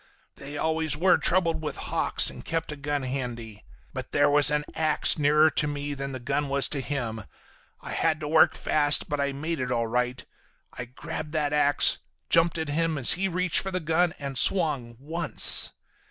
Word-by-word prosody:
They 140 +1 -8
always 160 -1 0
were 180 +3 +3
troubled 170 -3 +1
with 150 -2 -4
hawks - - +2
and - - -11
kept 165 -1 -3
a - - -5
gun 145 -1 -3
handy. 120 -5 -5 0.3
But - - -7
there - - +3
was 145 0 +5
an 150 0 -1
ax 155 -1 +3
nearer 150 +2 +4
to 150 - 0
me 145 0 -4
than 140 0 -5
the 130 - -6
gun 140 +3 -2
was 140 0 +2
to 140 - -2
him. 120 -5 -4 0.6
I - - -8
had 160 -1 0
to 150 - -4
work 160 0 +4
fast 145 -1 +2
but 145 -1 -2
I 140 0 0
made 155 +3 -4
it 125 -1 -3
all 115 -2 0
right. 125 +2 -2 0.5
I 125 - -6
grabbed 150 +5 -7
that 150 -2 -1
ax, 145 -1 +2 0.3
jumped 165 0 +3
at 160 -2 -3
him 160 +1 -1
as 130 - +3
he 195 +2 -1
reached 180 -1 0
for 195 - -4
the 185 -1 -2
gun, 165 +1 0
and 140 -2 -4
swung—once. 150 -2 0
145 Hz, 190 wpm, -26 LUFS, 135-160 Hz, 0.6 s, was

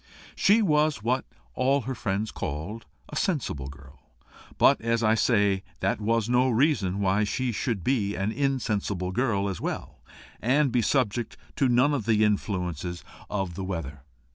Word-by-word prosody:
She 215 +3 +4
was 150 - +2
what 125 +3 0 0.3
all 135 +2 +2
her 130 +2 -4
friends 105 -1 -2
called 90 +8 -5 0.2
a - - -8
sensible 125 - -1
girl; 70 0 -13 0.6
but, - - +5
as 115 0 0
I 110 0 +4
say, 100 -4 +2 0.2
that 100 +3 0
was 115 +1 +1
no 125 +1 +3
reason 110 - +1
why 100 +2 +2
she 125 +4 -1
should 115 -4 -2
be 105 -3 0
an 100 +3 -1
insensible 105 -9 -1
girl 100 -2 0
as 95 -3 -4
well, - - -5 0.4
and 135 +3 +2
be 120 0 +2
subject 120 -2 0 0.2
to 135 - +3
none 125 +4 +4
of 120 -7 -2
the 110 -1 +4
influences 90 -5 -1 0.3
of 95 -4 -2
the 95 - -5
weather. 80 -7 -5
110 Hz, 160 wpm, -27 LUFS, 95-130 Hz, 0.6 s, but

